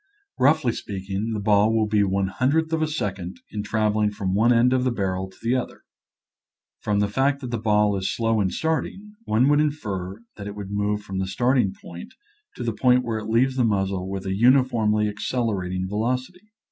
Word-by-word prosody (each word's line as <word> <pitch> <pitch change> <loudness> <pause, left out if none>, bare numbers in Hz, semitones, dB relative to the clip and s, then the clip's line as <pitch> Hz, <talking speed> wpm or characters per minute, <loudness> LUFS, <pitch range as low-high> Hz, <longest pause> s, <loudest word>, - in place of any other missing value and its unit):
Roughly 145 -1 +3
speaking, 100 +1 -4
the 105 - -2
ball 105 +1 +3
will 110 -1 +2
be 105 -1 +2
one 95 -1 +1
hun 130 +7 0
dredth 160 +2 +1
of 160 - +1
a 155 - +2
second 100 - -4
in 105 - -3
traveling 105 0 +1
from 100 -2 -3
one 110 +5 +3
end 120 +2 +4
of 130 -1 +2
the 130 - +2
barrel 95 -4 -2
to 95 - -20
the 115 +2 +1
other. 130 -1 -3 1.0
From 105 -1 0
the 105 - +2
fact 135 +6 +1
that 125 -3 -6
the 120 - -2
ball 105 -1 +2
is 95 -1 -1
slow 115 -2 +1
in 95 - +1
starting, 160 - -3
one 115 +5 +2
would 145 0 +4
infer 105 -9 -3
that 100 -1 -7
it 100 - -7
would 100 -1 -7
move 105 0 -1
from 95 -2 -5
the 95 - -1
starting 120 +1 +1
point 85 0 -10 0.4
to - - -5
the 115 -2 -1
point 125 +3 +3
where 115 -2 -2
it 110 0 -7
leaves 130 +4 +2
the 125 - +3
muzzle 95 -3 0
with 95 -1 -5
a 95 - -1
uniformly 115 -2 +3
accelerating 100 -4 -2
velocity. 125 - -3
110 Hz, 205 wpm, -24 LUFS, 100-125 Hz, 1.0 s, end